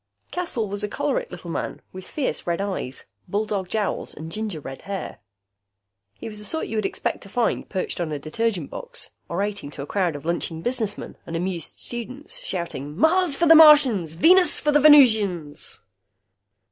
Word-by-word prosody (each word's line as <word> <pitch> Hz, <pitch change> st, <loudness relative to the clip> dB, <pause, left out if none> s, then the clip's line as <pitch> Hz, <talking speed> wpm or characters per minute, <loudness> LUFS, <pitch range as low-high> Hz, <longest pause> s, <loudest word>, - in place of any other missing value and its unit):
Caswell 335 Hz, -12 st, -2 dB
was 200 Hz, +1 st, -4 dB
a -, -, 0 dB
choleric -, -, -2 dB
little -, -, -8 dB
man -, -, -4 dB
with 185 Hz, 0 st, -9 dB
fierce 285 Hz, -10 st, -3 dB
red 170 Hz, -1 st, 0 dB
eyes, 190 Hz, -10 st, -4 dB, 0.2 s
bulldog 205 Hz, -3 st, -2 dB
jowls 210 Hz, -1 st, -2 dB
and 160 Hz, +2 st, -8 dB
ginger 215 Hz, -5 st, -4 dB
red 135 Hz, -2 st, -8 dB
hair. 195 Hz, -1 st, -6 dB, 1.0 s
He -, -, -8 dB
was 210 Hz, -1 st, -5 dB
the -, -, -8 dB
sort 320 Hz, +8 st, -2 dB
you 225 Hz, -, -5 dB
would 210 Hz, -2 st, +1 dB
expect -, -, -3 dB
to 195 Hz, -, -10 dB
find 235 Hz, +3 st, -1 dB
perched 185 Hz, -2 st, -3 dB
on 165 Hz, -2 st, -2 dB
a 150 Hz, -, -2 dB
detergent 170 Hz, +3 st, -2 dB
box, -, -, -6 dB, 0.2 s
orating 200 Hz, -2 st, -2 dB
to 140 Hz, -, -6 dB
a -, -, -6 dB
crowd 180 Hz, -1 st, 0 dB
of 145 Hz, -, -8 dB
lunching 165 Hz, -1 st, -2 dB
businessmen 230 Hz, -5 st, -3 dB
and 165 Hz, -, -5 dB
amused 175 Hz, -1 st, -4 dB
students, 255 Hz, -, -6 dB
shouting, 170 Hz, -, -5 dB
"Mars 320 Hz, -, +4 dB
for 340 Hz, -, +2 dB
the 325 Hz, -, +8 dB
Martians, 285 Hz, -, +7 dB
Venus 355 Hz, -, +5 dB
for 300 Hz, -, +1 dB
the 295 Hz, -, +5 dB
Venusians!" 215 Hz, -, +4 dB
205 Hz, 175 wpm, -24 LUFS, 170-275 Hz, 1.0 s, the